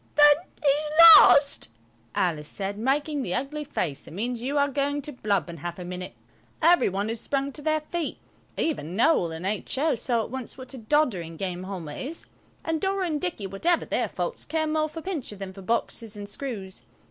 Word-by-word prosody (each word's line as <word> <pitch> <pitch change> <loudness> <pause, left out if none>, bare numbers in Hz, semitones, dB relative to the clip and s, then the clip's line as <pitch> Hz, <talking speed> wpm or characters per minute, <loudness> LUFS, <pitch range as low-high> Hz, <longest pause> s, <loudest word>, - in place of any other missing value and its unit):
"Well, 295 0 +9
then, 315 +5 -9 0.2
he's 300 +2 +1 0.2
lost," 280 - +6 0.5
Alice 155 -5 0
said, 200 0 -3
making 285 +4 0
the 185 -8 -2
ugly 290 +4 -3
face 165 - -3
that - - -11
means 235 +4 -2
you 275 +4 -2
are 285 0 +4
going 285 +1 -1
to 295 - -5
blub 205 - -1
in 170 -1 -8
half 170 +3 -6
a 180 - -7
minute. 180 0 -6 0.4
Every 335 -6 +5
one 195 +2 -2
had 225 +1 -3
sprung 275 +2 -2
to 295 - -7
their 310 +1 +1
feet. 325 +1 -4 0.4
Even 185 - -2
Noël 230 - +3
and 165 +3 -7
H.O. 260 +9 0
saw 235 -1 0
at - - -9
once 260 -2 -6
what 260 0 -9
a 260 - -8
doddering 215 - 0
game 185 -1 -4
Halma 180 -6 -6
is, 295 - -4 0.4
and 325 -1 -1
Dora 390 -1 0
and 310 -4 -2
Dicky, 345 - -3
whatever 320 - 0
their - - -1
faults, 485 - -4
care 320 -1 -1
more 310 0 0
for 320 +1 -8
Pincher 320 - -4
than 195 -1 -7
for 195 - -11
boxes 225 +1 -2
and 205 0 -7
screws. 205 - -6
255 Hz, 200 wpm, -26 LUFS, 195-300 Hz, 0.5 s, Well